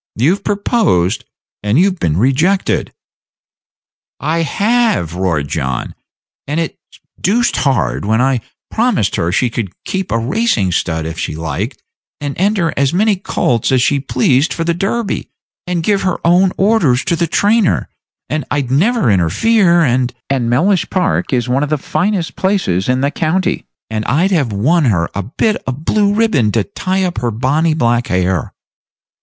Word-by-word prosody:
You've 155 - +1
proposed, 200 - +1 0.4
and 105 +4 +1
you've 185 +1 +2
been 80 -1 0
rejected." 150 - +1 1.3
"I 160 +3 -1
have," 210 - +1
roared 85 -6 -1
John; 65 -4 -3 0.5
"and 150 +3 -1
it's 165 - -2 0.5
doosed 235 +6 +1
hard, 135 -3 0
when 110 +2 +1
I 130 -1 +1 0.3
promised 230 - +1
her 85 - 0
she 120 +5 +1
should 110 -6 -3
keep 190 0 -3
a 115 - +2
racing 120 - 0
stud 80 -2 -1
if 80 0 -5
she - - -3
liked, 85 - -4 0.4
and 145 -1 -4
enter 190 -4 +1
as 140 +3 +1
many 210 +2 +3
colts 120 - 0
as 130 -2 +3
she 140 +1 +2
pleased 130 +3 +1
for 165 - -2
the 170 0 +1
Derby, 195 +5 -2 0.4
and 175 -2 -1
give 200 +2 +1
her 185 -2 0
own 180 +2 +4
orders 185 - +2
to 180 -3 +1
the 170 0 0
trainer, 205 +4 +2 0.4
and 155 -1 -2
I'd 140 -4 -1
never 195 - +2
interfere; 170 - +3
and 125 -4 +1 0.2
and 125 -4 0
Mellish 180 +10 +2
Park 185 -2 0
is 125 -2 0
one 125 +2 +1
of 145 - -1
the 155 - +1
finest 180 +4 -1
places 180 - 0
in 130 +1 +1
the 140 +1 +1
county; 170 +4 -1 0.2
and 110 -1 -3
I'd 170 +9 +1
have 145 - +1
won 145 +11 +2
her 85 -8 +1
a 100 - -2
bit 170 - -1
of 130 +4 -4
blue 205 +1 +2
ribbon 205 - +2
to 115 - +2
tie 190 - -2
up 180 -1 -2
her 120 - -1
bonny 145 +8 +1
black 120 -4 +1
hair." 90 0 0
145 Hz, 165 wpm, -15 LUFS, 115-190 Hz, 1.3 s, own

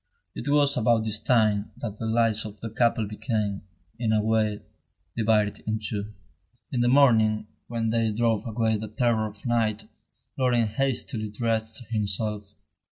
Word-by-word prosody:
It - - -5
was 145 -1 +3
about 115 -1 +3
this 110 -1 -2
time 110 -4 +2
that 105 -2 -6
the 115 - -3
lives 110 -1 +2
of 105 -1 -9
the 115 - -6
couple 115 -1 +2
became, 105 -1 -2 0.4
in 115 -2 0
a 110 - +3
way, 110 -1 +1 0.5
divided 105 -2 +2
in 110 0 0
two. 105 0 -3 0.6
In 125 - 0
the 120 - +3
morning, 110 -5 +4 0.2
when 115 -1 -1
day 115 -1 +1
drove 115 0 0
away 110 -1 +1
the 110 +1 -5
terror 110 0 +1
of 105 -1 -13
night, 115 -3 0 0.5
Laurent 120 -4 +2
hastily 120 -2 -1
dressed 110 +1 -2
himself. 105 -1 -2
110 Hz, 155 wpm, -26 LUFS, 105-115 Hz, 0.6 s, morning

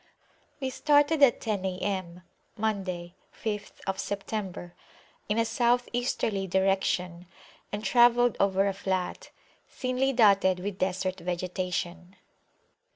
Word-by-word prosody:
We 265 -2 -2
started 290 +3 +3
at 270 -4 +5
ten 210 -4 -2
A.M. 185 -2 -3 0.3
(Monday, 190 -5 -2 0.3
5th 205 -2 -4
September) 195 -3 -4 0.6
in 210 - +1
a 230 - +3
South 240 +2 +2
Easterly 225 -5 -1
direction, 185 -2 0 0.4
and 205 +1 -4
travelled 240 -1 +5
over 195 0 +3
a 195 - 0
flat, 190 -2 -3 0.4
thinly 255 +1 0
dotted 200 -6 +4
with 195 +1 -5
Desert 185 0 -1
vegetation. 180 0 -3
195 Hz, 105 wpm, -28 LUFS, 185-230 Hz, 0.6 s, at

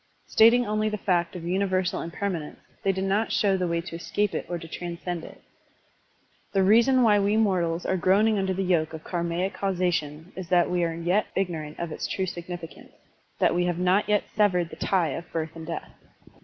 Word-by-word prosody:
Stating 235 +2 +5
only 215 0 0
the 210 - -3
fact 180 -2 0
of 175 - -6
universal 185 0 0
impermanence, 170 -2 -4 0.2
they 195 - +2
did 190 0 -3
not 200 +3 +1
show 200 -2 +2
the 180 -1 0
way 170 0 0
to 170 -1 -8
escape 205 +4 -1
it - - -3
or 175 - -2
to 165 -1 -9
transcend 175 0 -5
it. - - -12 1.1
The 195 -1 +3
reason 235 +6 +5
why 210 -3 +5
we 205 +2 +2
mortals 180 -6 +1
are 190 - +1
groaning 200 +4 +3
under 190 -1 0
the 190 +1 -1
yoke 165 -4 +1
of 160 0 -7
karmaic 175 +2 -2
causation 175 -4 -2
is 185 -3 -7
that 175 -1 +3
we 175 -1 +1
are 165 -1 -1
yet 175 +5 +1
ignorant 160 -6 -2
of 170 -2 -3
its - - -4
true 190 - -1
significance, 175 -1 -8 0.4
that - - +3
we 175 0 +1
have 175 -1 -1
not 185 +4 +2
yet 210 -1 +3
severed 180 -6 +2
the - - -7
tie 180 -5 +1
of 165 +5 -6
birth 160 -1 -3
and 160 -1 -8
death. 170 - -5
180 Hz, 200 wpm, -26 LUFS, 170-200 Hz, 1.1 s, Stating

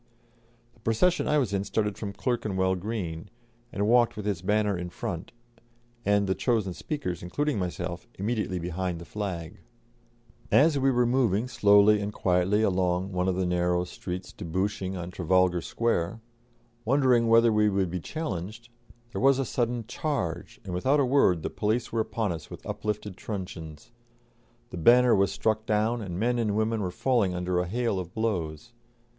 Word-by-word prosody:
The - - -26
procession 115 +12 +1
I 150 - +3
was 125 -8 0
in 100 -1 0
started 105 0 -1
from 100 -2 -5
Clerkenwell 100 -6 0
Green, 90 -3 -4 0.4
and 100 +1 -1
walked 120 -1 +4
with 105 - -5
its 100 -5 -1
banner 105 +1 +1
in 90 0 -4
front, 85 0 -5 0.7
and 100 0 +2
the 95 - +1
chosen 110 -5 0
speakers, 140 - -4
including 145 +7 -1
myself, 90 -1 -4
immediately 105 -2 -1
behind 90 +1 -3
the 85 - -9
flag. 90 -6 -5 0.9
As 145 0 +5
we 135 0 +3
were 125 -2 +3
moving 120 -3 +2
slowly 105 -2 +5
and 100 +1 -3
quietly 95 +2 +1
along 90 -1 +1
one 90 0 0
of 95 - +1
the 95 0 0
narrow 90 0 +1
streets 90 +1 -6
debouching 95 +2 -2
on 85 0 -6
Trafalgar 90 0 +2
Square, 115 -1 -1 0.6
wondering 125 -2 +3
whether 115 0 +5
we 105 0 +4
should 95 -4 0
be 90 - -2
challenged, 110 - -5 0.4
there - - -4
was 135 0 +5
a 135 - 0
sudden 120 -1 -1
charge, 125 - -3
and 95 - -6
without 130 +12 +2
a 140 - +3
word 125 - +3
the - - -3
police 110 +3 -1
were 115 - +1
upon 110 -2 -2
us 80 -2 -6
with - - -10
uplifted 105 -2 -4
truncheons; 85 -7 -7 0.8
the - - -6
banner 120 +7 +6
was 100 0 +3
struck 110 0 -1
down, 110 +2 +1
and 90 -3 -5
men 120 +2 +1
and 105 -3 0
women 110 0 0
were 95 - -1
falling 100 -1 +1
under 90 0 0
a 90 - -1
hail 115 0 -1
of 90 -1 -7
blows. 100 -3 -2
100 Hz, 170 wpm, -27 LUFS, 90-115 Hz, 0.9 s, banner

